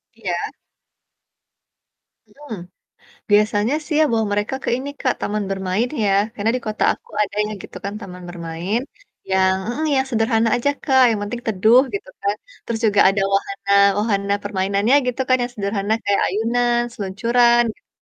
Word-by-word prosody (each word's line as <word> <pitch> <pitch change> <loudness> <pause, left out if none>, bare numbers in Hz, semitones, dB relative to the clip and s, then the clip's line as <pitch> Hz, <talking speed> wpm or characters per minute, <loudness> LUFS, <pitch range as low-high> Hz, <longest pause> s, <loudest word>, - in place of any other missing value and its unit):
Iya. 185 -6 -3 1.8
Mhm. 290 -6 -9 0.8
Biasanya 210 +4 +3
sih 320 - -3
ya - - +6
bawa 225 -1 +2
mereka 205 +5 -1
ke - - -2
ini, 265 +3 -5
Kak, 255 - +1
taman 210 0 -2
bermain 195 +4 -1 0.2
ya, 200 - +2 0.2
karena 220 -1 0
di - - -4
kota 215 0 -3
aku - - -15
ada 205 0 -4
ya, - - -5
gitu - - -11
kan, 200 +1 -3
taman 180 -4 -9
bermain, 175 +4 -3 0.5
yang 190 0 +3
mhm, 285 +6 -2
yang 265 0 +1
sederhana 225 -1 +2
aja, 245 +4 +1
Kak, 265 -3 +4
yang 220 - 0
penting 235 +4 -4
teduh, 220 +3 +5
gitu 405 +5 -4
kan. 405 0 +1 0.3
Terus 230 -1 -3
juga 205 -1 +3
ada 195 +1 +1
wahana 200 0 -2 0.3
wahana 200 -2 0
permainannya, 200 +4 +1
gitu 250 +1 -2
kan, 255 - +5
yang 245 - -2
sederhana 200 0 -2
kayak 200 0 +2
ayunan 240 +4 +1
seluncuran, 235 +4 +2
gitu - - -35
215 Hz, 160 wpm, -20 LUFS, 200-240 Hz, 1.8 s, ya